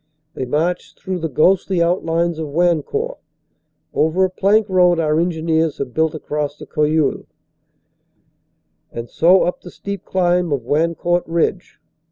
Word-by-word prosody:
They 130 Hz, -, -4 dB
march 165 Hz, +7 st, -2 dB
through 185 Hz, -1 st, -4 dB
the 165 Hz, -1 st, -3 dB
ghostly 185 Hz, +5 st, +2 dB
outlines 170 Hz, -1 st, 0 dB
of 160 Hz, -, -3 dB
Wan 170 Hz, +2 st, +2 dB
court, 475 Hz, -, -4 dB, 0.7 s
over 165 Hz, +5 st, +2 dB
a 185 Hz, -, -3 dB
plank 205 Hz, +3 st, +2 dB
road 180 Hz, -3 st, +3 dB
our 155 Hz, -1 st, +1 dB
engineers 160 Hz, -2 st, 0 dB
have 130 Hz, -3 st, -5 dB
built 160 Hz, 0 st, +1 dB
across 150 Hz, -1 st, -3 dB
the -, -, -10 dB
Cojeul, 150 Hz, 0 st, 0 dB, 1.6 s
and 115 Hz, 0 st, -6 dB
so 180 Hz, +3 st, +4 dB
up 180 Hz, -, -2 dB
the 180 Hz, -, -10 dB
steep 200 Hz, +2 st, -7 dB
climb 180 Hz, -2 st, +1 dB
of 140 Hz, -4 st, -1 dB
Wancourt 170 Hz, +5 st, 0 dB
Ridge. 170 Hz, +2 st, -1 dB
170 Hz, 145 wpm, -19 LUFS, 155-180 Hz, 1.6 s, so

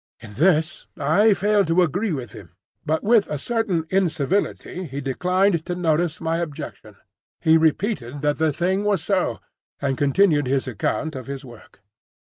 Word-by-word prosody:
In 105 Hz, -, -12 dB
this 160 Hz, -, +1 dB
I 190 Hz, +9 st, +3 dB
failed 205 Hz, +1 st, +2 dB
to 170 Hz, +2 st, +4 dB
agree 190 Hz, +6 st, -1 dB
with 125 Hz, -8 st, -4 dB
him, -, -, -13 dB, 0.3 s
but 155 Hz, +1 st, 0 dB
with 220 Hz, -1 st, +3 dB
a 150 Hz, -, -2 dB
certain 205 Hz, -, -1 dB
incivility 185 Hz, +1 st, -1 dB
he 140 Hz, -2 st, -6 dB
declined 180 Hz, +6 st, +1 dB
to 175 Hz, -, -2 dB
notice 170 Hz, 0 st, 0 dB
my 165 Hz, +1 st, -1 dB
objection. 165 Hz, -4 st, -6 dB, 0.4 s
He 160 Hz, 0 st, +4 dB
repeated 160 Hz, -, 0 dB
that 145 Hz, 0 st, +1 dB
the 160 Hz, -1 st, +2 dB
thing 185 Hz, +6 st, 0 dB
was 200 Hz, -6 st, +1 dB
so, 180 Hz, -, 0 dB, 0.4 s
and 135 Hz, -2 st, -2 dB
continued 145 Hz, 0 st, +3 dB
his 135 Hz, 0 st, 0 dB
account 130 Hz, +6 st, -2 dB
of 130 Hz, -2 st, -7 dB
his 135 Hz, -1 st, -6 dB
work. 120 Hz, -4 st, -15 dB
160 Hz, 160 wpm, -22 LUFS, 140-190 Hz, 0.4 s, to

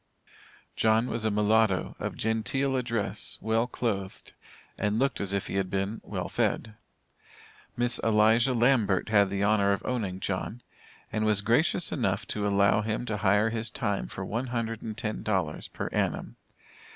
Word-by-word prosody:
John 110 Hz, +1 st, +3 dB
was 115 Hz, -2 st, -3 dB
a -, -, +3 dB
mulatto, 105 Hz, -1 st, +2 dB
of -, -, -4 dB
genteel 120 Hz, +5 st, 0 dB
address, 115 Hz, -4 st, -2 dB
well 115 Hz, +2 st, +1 dB
clothed, 100 Hz, -6 st, -4 dB, 0.4 s
and 105 Hz, +1 st, 0 dB
looked 135 Hz, +3 st, 0 dB
as 100 Hz, -1 st, -2 dB
if 100 Hz, -1 st, -1 dB
he -, -, -3 dB
had 95 Hz, -1 st, 0 dB
been 95 Hz, +3 st, -2 dB
"well -, -, -4 dB
fed." 110 Hz, -, -1 dB, 1.0 s
Miss 120 Hz, 0 st, +2 dB
Eliza 115 Hz, +3 st, +3 dB
Lambert 115 Hz, -7 st, +2 dB
had 100 Hz, -2 st, +4 dB
the 100 Hz, +1 st, -1 dB
honor 100 Hz, -1 st, +3 dB
of 100 Hz, -, -4 dB
owning 105 Hz, -7 st, -2 dB
John, 100 Hz, +5 st, -3 dB, 0.5 s
and 110 Hz, -, -1 dB
was 105 Hz, -2 st, +2 dB
gracious 125 Hz, -, +2 dB
enough 100 Hz, -8 st, -1 dB
to 105 Hz, -1 st, -1 dB
allow 100 Hz, +1 st, +3 dB
him 110 Hz, +2 st, -2 dB
to 110 Hz, -3 st, -2 dB
hire 105 Hz, +2 st, +3 dB
his 115 Hz, 0 st, -3 dB
time 100 Hz, -, -2 dB
for -, -, -6 dB
one 120 Hz, +4 st, -2 dB
hundred 115 Hz, -2 st, -3 dB
and 110 Hz, -1 st, -6 dB
ten 110 Hz, -2 st, -3 dB
dollars 95 Hz, -8 st, -1 dB
per -, -, -5 dB
annum. -, -, -1 dB
110 Hz, 165 wpm, -28 LUFS, 100-115 Hz, 1.0 s, had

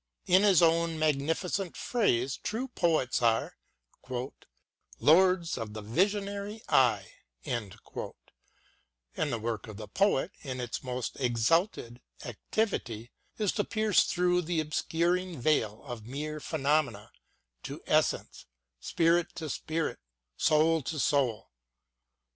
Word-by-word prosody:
In 185 Hz, +2 st, +5 dB
his 195 Hz, -5 st, +5 dB
own 165 Hz, 0 st, +3 dB
magnificent 160 Hz, +5 st, -1 dB
phrase, 135 Hz, -, +1 dB
true 245 Hz, +5 st, -3 dB
poets 160 Hz, -, +1 dB
are 115 Hz, -1 st, +1 dB, 0.7 s
" -, -, -21 dB
lords 175 Hz, 0 st, +4 dB
of 110 Hz, -2 st, -6 dB
the 110 Hz, -, -6 dB
visionary 200 Hz, -, -1 dB
eye," 115 Hz, -7 st, +3 dB, 0.3 s
and 110 Hz, -6 st, -3 dB
the -, -, -8 dB
work 115 Hz, 0 st, -3 dB
of 105 Hz, -2 st, -9 dB
the 110 Hz, -1 st, -8 dB
poet 195 Hz, -8 st, +1 dB
in 130 Hz, -2 st, -5 dB
its 120 Hz, -2 st, -4 dB
most 125 Hz, 0 st, -4 dB
exalted 125 Hz, -, +1 dB, 0.2 s
activity 120 Hz, -, -3 dB, 0.3 s
is 210 Hz, -3 st, +1 dB
to 205 Hz, -, 0 dB
pierce 215 Hz, -2 st, +2 dB
through 180 Hz, 0 st, +2 dB
the 170 Hz, -1 st, -1 dB
obscuring 170 Hz, +2 st, -1 dB
veil 115 Hz, -7 st, +1 dB
of 120 Hz, -5 st, -8 dB
mere 150 Hz, +4 st, -4 dB
phenomena 140 Hz, -8 st, 0 dB, 0.5 s
to -, -, -8 dB
essence, -, -, 0 dB, 0.3 s
spirit 165 Hz, -, +1 dB
to 160 Hz, -4 st, -4 dB
spirit, 160 Hz, 0 st, -3 dB, 0.4 s
soul 160 Hz, -, +3 dB
to 150 Hz, +4 st, -4 dB
soul. 130 Hz, -6 st, +1 dB
155 Hz, 115 wpm, -30 LUFS, 120-180 Hz, 0.7 s, In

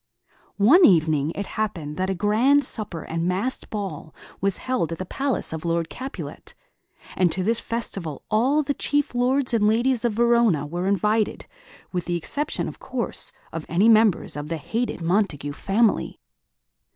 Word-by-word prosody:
One 265 Hz, -, +6 dB
evening 160 Hz, -, +4 dB
it 200 Hz, -, -3 dB
happened 170 Hz, -10 st, -3 dB
that 185 Hz, +1 st, -1 dB
a 190 Hz, -, 0 dB
grand 235 Hz, +9 st, +3 dB
supper 200 Hz, -7 st, -2 dB
and 165 Hz, +1 st, -2 dB
masked 195 Hz, +8 st, -1 dB
ball 190 Hz, -7 st, -5 dB, 0.3 s
was 195 Hz, 0 st, +1 dB
held 220 Hz, -11 st, -1 dB
at 165 Hz, -, -4 dB
the 185 Hz, -, -5 dB
palace 270 Hz, -, -1 dB
of 160 Hz, -, -5 dB
Lord 170 Hz, -1 st, -1 dB
Capulet; 265 Hz, +2 st, -8 dB, 0.6 s
and 180 Hz, -3 st, +3 dB
to 185 Hz, -, -1 dB
this 225 Hz, +4 st, +1 dB
festival 195 Hz, -, -4 dB
all 260 Hz, +8 st, +3 dB
the 285 Hz, 0 st, -1 dB
chief 290 Hz, -1 st, -1 dB
lords 250 Hz, +1 st, +1 dB
and 215 Hz, -2 st, +3 dB
ladies 235 Hz, +3 st, +2 dB
of 235 Hz, -2 st, +1 dB
Verona 235 Hz, -9 st, +3 dB
were 175 Hz, +5 st, -3 dB
invited, 210 Hz, +2 st, +1 dB, 0.5 s
with 180 Hz, -2 st, -3 dB
the 175 Hz, -, -1 dB
exception, 285 Hz, -, -2 dB
of -, -, -8 dB
course, -, -, -3 dB, 0.2 s
of 165 Hz, -, -4 dB
any 185 Hz, +7 st, +3 dB
members 220 Hz, -4 st, +4 dB
of 145 Hz, 0 st, -5 dB
the 165 Hz, +1 st, -3 dB
hated 200 Hz, +7 st, -3 dB
Montague 165 Hz, -6 st, 0 dB
family. 210 Hz, +8 st, +1 dB
200 Hz, 165 wpm, -24 LUFS, 170-235 Hz, 0.6 s, One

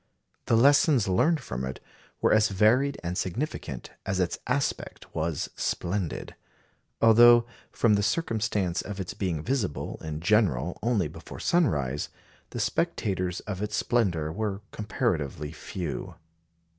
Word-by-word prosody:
The -, -, +4 dB
lessons 140 Hz, -1 st, +5 dB
learned 155 Hz, -, +2 dB
from 65 Hz, +1 st, -5 dB
it 65 Hz, 0 st, -4 dB, 0.4 s
were -, -, +4 dB
as 110 Hz, 0 st, +4 dB
varied 120 Hz, +8 st, +3 dB
and 85 Hz, +1 st, -2 dB
significant 95 Hz, -, -4 dB
as 95 Hz, -1 st, -2 dB
its 90 Hz, -2 st, 0 dB
aspect 130 Hz, +2 st, -2 dB
was 80 Hz, -2 st, -2 dB
splendid; 90 Hz, -2 st, -2 dB, 0.7 s
although 120 Hz, +1 st, +8 dB, 0.3 s
from 115 Hz, -3 st, +3 dB
the 100 Hz, -, +3 dB
circumstance 105 Hz, -, 0 dB
of 100 Hz, -1 st, -7 dB
its 95 Hz, -, -4 dB
being 85 Hz, -6 st, -2 dB
visible 115 Hz, -, -2 dB
in 75 Hz, -1 st, -4 dB
general 90 Hz, -, +2 dB
only 110 Hz, -8 st, +1 dB
before -, -, -10 dB
sunrise, 75 Hz, -, +1 dB, 0.4 s
the -, -, -6 dB
spectators 90 Hz, -3 st, -1 dB
of 105 Hz, -2 st, -5 dB
its 105 Hz, 0 st, -2 dB
splendour 90 Hz, -12 st, +1 dB
were 100 Hz, +2 st, -3 dB
comparatively 80 Hz, -, -2 dB
few. 80 Hz, -3 st, -5 dB
100 Hz, 130 wpm, -27 LUFS, 85-115 Hz, 0.7 s, although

